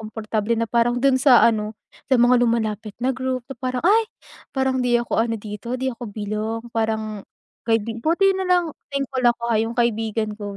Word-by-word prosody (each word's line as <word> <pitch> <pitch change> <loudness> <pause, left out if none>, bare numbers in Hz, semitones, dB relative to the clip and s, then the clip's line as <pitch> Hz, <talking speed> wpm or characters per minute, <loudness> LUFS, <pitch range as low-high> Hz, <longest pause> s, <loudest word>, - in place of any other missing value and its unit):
komportable 215 0 -3
na 230 - +1
parang 240 +1 +2
do'n 270 0 +4
sa 260 -3 +6
ano 215 -2 +1 0.3
sa 265 - +4
mga 245 +1 +4
lumalapit 220 -3 -1
na 250 - 0
group 260 0 -2
na 270 - -8
parang, 255 -1 -2
ay! 440 +5 +5 0.5
parang 265 -1 0
hindi 245 -1 +3
ako 235 -1 0
ano 230 0 0
dito 210 +4 -6
'di 260 0 -2
ako 235 -1 -8
belong 215 +2 -4
parang 220 -2 -2 0.4
kaibi 225 0 -1
buti 345 +8 +3
na 375 - -2
lang 360 -1 +4 0.2
thankful 275 -2 -2
ako 240 -1 +2
ha 215 - +3
yung 225 +1 -3
kaibigan 225 -2 0
ko 205 -1 -7
235 Hz, 185 wpm, -22 LUFS, 220-255 Hz, 0.5 s, sa